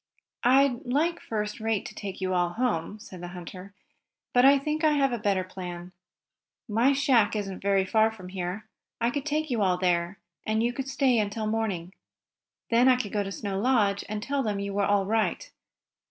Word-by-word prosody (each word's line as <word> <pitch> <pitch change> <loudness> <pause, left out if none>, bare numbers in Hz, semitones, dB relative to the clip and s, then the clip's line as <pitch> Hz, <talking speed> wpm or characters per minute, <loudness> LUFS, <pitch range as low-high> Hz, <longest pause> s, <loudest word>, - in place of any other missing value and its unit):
"I'd 260 0 +4
like 315 +7 0
first 210 -1 -3
rate 220 -2 -1
to - - -8
take 195 -2 -6
you 185 0 -1
all 175 -1 +1
home," 215 -5 -1
said 190 -4 -11
the 175 - -6
hunter, 185 +3 -10 0.6
"but 245 - +5
I 275 +1 +7
think 300 +3 -2
I 310 -1 +4
have 275 -3 +2
a 240 - -2
better 200 -3 +1
plan. 180 -1 -8 0.8
My 230 +5 +3
shack 260 -6 +3
isn't 195 -3 -4 0.3
far 220 +2 +3
from 185 -5 -11
here. 185 +3 -5 0.3
I 235 +1 +1
could 285 +1 -3
take 305 0 -1
you 230 -3 0
all 185 -2 +2
there, 175 0 0 0.3
and 220 +1 0
you 240 +1 0
could 270 +1 -4
stay 265 -3 +2
until 215 +1 -2
morning. 205 -5 -2 0.8
Then 235 +2 +5
I 255 - +6
could 235 -5 -4
go 210 - +1
to 195 -1 -4
Snow 195 -1 -3
Lodge 210 -4 +2
and 210 0 -4
tell 280 +2 -1
them 210 -5 -2
you 200 0 -4
were 200 0 +1
all 200 -1 +2
right. 225 - -1
215 Hz, 195 wpm, -27 LUFS, 195-250 Hz, 0.8 s, I